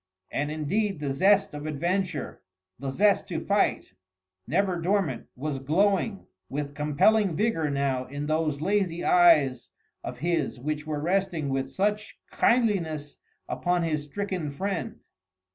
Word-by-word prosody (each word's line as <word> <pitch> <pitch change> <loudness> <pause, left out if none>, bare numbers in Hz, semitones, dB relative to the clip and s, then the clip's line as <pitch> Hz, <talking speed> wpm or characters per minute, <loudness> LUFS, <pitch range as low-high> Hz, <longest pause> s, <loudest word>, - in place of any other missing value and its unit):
And 145 +1 -1
indeed 175 +6 -1
the 140 -2 -2
zest 195 +7 +3
of 150 +1 -6
adventure, 170 +1 -2 0.4
the 135 - -3
zest 200 +9 +2
to - - -3
fight, - - 0 0.5
never 180 +4 +1
dormant, 190 0 0
was 140 +1 -3
glowing 195 +7 +1 0.2
with 145 +1 -4
compelling 160 +7 +2
vigour 165 -6 +1
now 140 -2 0
in 145 +2 -5
those 155 -1 0
lazy 185 -2 0
eyes 150 -8 +4 0.3
of - - -6
his 170 -3 -1
which 150 +3 -3
were 150 -1 -2
resting 175 -2 0
with 135 0 -1
such 210 +6 -1
kindliness 170 - +1 0.3
upon 175 -1 0
his 155 -3 -1
stricken 180 0 -3
friend. 195 +8 -4
160 Hz, 130 wpm, -27 LUFS, 145-195 Hz, 0.5 s, eyes